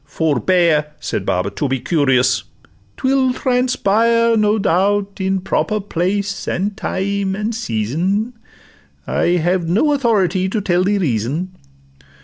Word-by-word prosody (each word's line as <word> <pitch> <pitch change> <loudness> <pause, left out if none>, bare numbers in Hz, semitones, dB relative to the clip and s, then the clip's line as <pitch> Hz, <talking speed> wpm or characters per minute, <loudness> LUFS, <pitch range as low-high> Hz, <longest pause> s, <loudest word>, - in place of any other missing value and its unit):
'—'Forbear,' 150 - +1
Said - - -4
Baba, 90 +2 0
'to 145 - -2
be 135 0 -1
curious; 130 -3 +1 0.5
'twill 260 -1 +1
transpire, 230 -3 +2
No 215 0 +2
doubt, 200 +1 0
in 190 0 0
proper 215 +3 -1
place, 195 +1 -2
and 200 +3 -1
time, 195 0 -2
and 215 +3 -2
season: 185 - -1 0.7
I 175 +1 +1
have 175 0 0
no 265 - +2
authority 195 - +1
to 215 - -1
tell 180 -2 +1
the 205 +1 +2
reason. 155 - -2
190 Hz, 125 wpm, -18 LUFS, 160-210 Hz, 0.7 s, transpire